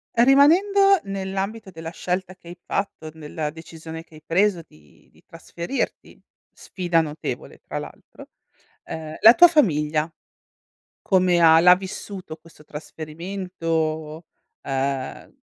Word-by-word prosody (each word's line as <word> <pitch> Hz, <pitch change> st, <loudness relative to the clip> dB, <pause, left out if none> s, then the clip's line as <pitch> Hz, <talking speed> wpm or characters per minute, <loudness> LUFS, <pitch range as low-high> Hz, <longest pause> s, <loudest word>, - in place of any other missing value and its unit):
rimanendo 355 Hz, -, +5 dB
nell'ambito 195 Hz, +2 st, -4 dB
della 165 Hz, -1 st, -8 dB
scelta 185 Hz, +2 st, -4 dB
che 180 Hz, -, -20 dB
hai 175 Hz, -, -10 dB
fatto, 195 Hz, -5 st, -4 dB
nella 155 Hz, -1 st, -5 dB
decisione 160 Hz, 0 st, -10 dB
che 165 Hz, -, -19 dB
hai 155 Hz, -, -15 dB
preso 185 Hz, +1 st, +2 dB
di 75 Hz, -1 st, -23 dB
di -, -, -25 dB
trasferirti, 170 Hz, -, -5 dB, 0.3 s
sfida 175 Hz, -3 st, -1 dB
notevole 155 Hz, -1 st, -6 dB
tra -, -, -7 dB
l'altro, -, -, -12 dB, 0.6 s
ehm, 155 Hz, -1 st, -7 dB
la 225 Hz, +2 st, +9 dB
tua 350 Hz, +3 st, +8 dB
famiglia 155 Hz, -, +1 dB, 0.9 s
come 180 Hz, -2 st, +3 dB
ha 160 Hz, -1 st, +7 dB
l'ha 180 Hz, +1 st, +8 dB
vissuto 190 Hz, -2 st, -7 dB
questo 160 Hz, -1 st, -19 dB
trasferimento 160 Hz, 0 st, -4 dB, 0.4 s
uhm, 135 Hz, -1 st, -3 dB
170 Hz, 115 wpm, -23 LUFS, 155-195 Hz, 0.9 s, la